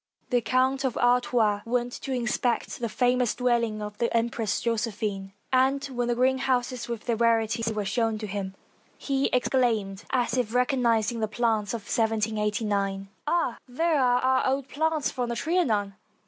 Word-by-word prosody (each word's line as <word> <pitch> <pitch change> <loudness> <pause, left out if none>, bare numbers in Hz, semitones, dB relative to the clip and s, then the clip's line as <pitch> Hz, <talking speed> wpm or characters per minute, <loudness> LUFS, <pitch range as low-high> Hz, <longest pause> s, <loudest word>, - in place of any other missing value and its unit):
The 245 -1 +3
Count 260 +4 +1
of 260 -3 -1
Artois 245 -4 +2
went 245 +1 -1
to 270 - -5
inspect 245 -1 -1
the 235 -1 -2
famous 250 0 +1
dwell 245 -1 +2
ing 215 -2 -3
of 210 0 -7
the 235 - +1
Empress 230 -2 -1
Josephine, 210 -4 -2 0.2
and 270 +2 +3
when 245 -3 -2
the 240 - +1
greenhouses, 255 -1 +1
with 235 -2 -5
their 235 - +1
rarities, 230 0 +1
were 210 -2 -2
shown 225 +1 0
him, 200 -2 -5 0.4
he 275 -1 0
exclaimed, 230 -6 0
as 255 0 0
if 240 -2 -1
recognizing 240 -3 +2
the 220 - 0
plants 220 -1 0
of 230 - -5
1789: 210 -2 -1
— - - -42
"Ah! 320 -7 0
there 310 +3 +1
are 245 -1 +3
our 260 0 +2
old 270 0 0
plants 315 0 0
from 245 -2 -3
the 235 - -2
Trianon!" 230 - 0
235 Hz, 160 wpm, -26 LUFS, 215-255 Hz, 0.4 s, The